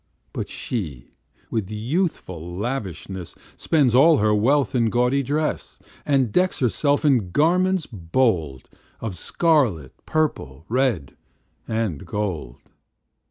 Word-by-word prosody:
But - - -4
she, 75 - -5 0.4
with 110 -4 -2
youthful 105 - -3
lavishness, 95 - -4 0.2
Spends 140 -7 +2
all 150 +5 +6
her 105 -2 +3
wealth 130 +6 +2
in 115 -3 +2
gaudy 125 +4 +2
dress, 150 +4 -2 0.3
And 135 -6 +2
decks 185 - +2
herself 145 +4 +1
in 125 -10 +3
garments 180 - +2
bold 85 - -1 0.3
Of 110 -5 -4
scarlet, 120 - +1
purple, 80 - -1
red, 120 - 0 0.5
and 110 -10 -2
gold. 85 -9 -3
115 Hz, 110 wpm, -23 LUFS, 90-145 Hz, 0.5 s, all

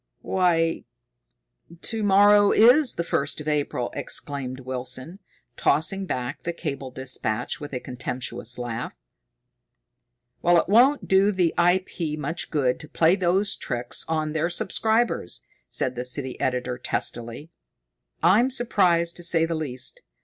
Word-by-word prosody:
"Why, 165 -3 +1 0.9
to 225 +4 -3
morrow 205 0 +5
is 250 +5 +5
the 170 - -2
first 150 -3 -1
of 150 - -8
April!" 145 -5 -1
exclaimed 130 -3 -4
Wilson, 130 +6 -6 0.4
tossing 195 +5 +1
back 125 -5 -4
the 170 - -3
cable 140 -5 -5
dispatch 125 -4 -1
with 145 - -7
a 125 - -3
contemptuous 125 -1 -3
laugh. 120 -2 -5 1.5
"Well, 175 0 +5
it - - -1
won't 250 +8 +4
do 195 +2 +4
the 180 -4 +1
I. 175 +2 +3
P. 155 -5 -4
much 150 +3 -4
good 135 -5 0
to 150 - -10
play 165 +2 +3
those 190 +2 +1
tricks 120 -2 -4
on 155 -1 -1
their 160 +2 0
subscribers," 220 - 0 0.3
said 130 - -1
the 125 0 -4
city 130 0 -1
editor 125 -1 -2
testily. 120 +7 -3 0.7
"I'm 210 +9 +5
surprised, 185 -9 +1
to 175 - -5
say 165 -1 +3
the 165 - -3
least. 135 -6 -4
160 Hz, 135 wpm, -24 LUFS, 130-190 Hz, 1.5 s, morrow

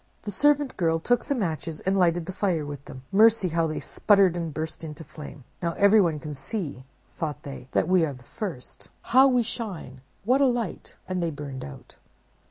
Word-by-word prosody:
"The 205 - -4
servant 290 +5 +2
girl 165 -2 +2
took 245 +9 +1
the 280 - 0
Matches 165 - -3
and 190 +1 +1
lighted 175 -3 +2
the 190 - -6
fire 180 -6 0
with 145 -1 -7
them. 130 - -10
mercy! 215 -1 +5
how 165 0 +1
they 155 - -3
sputtered 195 -4 +3
and 165 -2 -3
burst 155 +2 -5
out - - -4
into 150 +1 -8
flame! 150 -2 -10 0.2
'Now 170 -1 -1
everyone 200 -5 +4
can 150 0 -6
see,' 145 - -5 0.3
thought 150 -2 -4
they, 140 -3 -8
'that - - +2
we 185 -2 +4
are 150 -3 -1
the 125 -2 -14
first. 175 - -6 0.2
How 265 +2 +8
we 250 -2 +3
shine! 190 - -6 0.2
what 255 +5 +3
a 275 - +6
light!'—and 220 -5 -3
they 170 - 0
burned 140 -3 -6
out." 70 - -11
170 Hz, 195 wpm, -26 LUFS, 150-210 Hz, 0.3 s, How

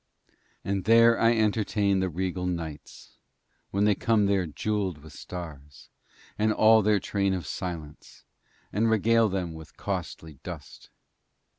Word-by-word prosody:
And 95 -1 -2
there 115 +1 +6
I 115 +1 +4
entertain 105 -2 +1
the 95 0 0
regal 90 +1 -3
nights 80 -5 -7 0.5
when 100 +1 0
they 105 0 +4
come 110 0 +2
there 100 -3 +1
jewelled 95 +2 -2
with 75 0 -14
stars, 75 -6 -9 0.5
and 110 +1 +3
all 110 +1 +5
their 105 0 +3
train 100 -1 0
of 90 - -5
silence, 80 -5 -7 0.5
and 110 +3 +2
regale 110 +1 +3
them 90 -3 -3
with 80 -1 -12
costly 80 -5 -5
dust. - - -10
95 Hz, 135 wpm, -27 LUFS, 85-110 Hz, 0.5 s, there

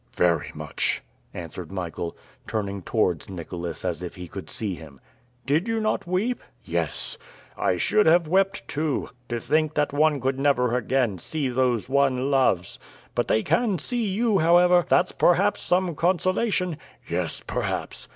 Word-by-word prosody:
"Very 85 -3 +2
much," - - -2 0.3
answered 85 0 -7
Michael, 85 -2 -4 0.3
turning 100 -3 -2
towards 90 -4 0
Nicholas 85 -2 -6
as 85 -2 -2
if 90 - -6
he 90 -2 -8
could - - -8
see 105 -4 -3
him. 75 -5 -11 0.5
"Did 155 - +1
you 225 0 0
not 215 -4 -1
weep?" 200 +8 0 0.2
"Yes." - - -2 0.4
"I - - +1
should 210 -4 +3
have 170 0 +5
wept 195 +3 +1
too. 150 -1 -1 0.2
To 120 -1 -1
think 155 +5 +1
that 150 -1 +1
one 150 0 +3
could 135 +1 -1
never 125 -4 +2
again 125 -5 0
see 145 - -2
those 125 -2 +1
one 135 0 +2
loves. 125 -10 +2 0.3
But - - 0
they 110 - +2
can 190 +5 +2
see 235 - -2
you, 205 +1 +2
however; 175 +2 +5
that's 180 - +4
perhaps 195 +4 +3
some 180 -1 +1
consolation!" 180 +1 +1 0.3
"Yes, - - -2
perhaps. - - -3
140 Hz, 150 wpm, -25 LUFS, -, 0.5 s, have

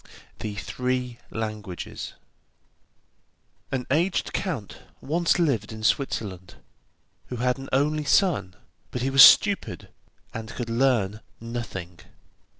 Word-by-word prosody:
THE 105 -1 -4
THREE 125 +2 -3
LANGUAGES 110 -4 -5 1.6
An 130 -2 -2
aged 170 +6 +1
count 145 - -3 0.2
once 170 +4 +1
lived 140 - +1
in 110 0 -8
Switzerland, 100 -8 -1 0.7
who 125 - -5
had 125 +2 0
an 135 - -8
only 150 +3 +1
son, 145 - +2 0.3
but 125 - -4
he 135 - 0
was 135 0 +7
stupid, 200 +9 +6 0.4
and 110 -1 -6
could 115 0 -5
learn 115 -5 +1 0.2
nothing. 110 -7 -6
125 Hz, 110 wpm, -25 LUFS, 110-135 Hz, 1.6 s, was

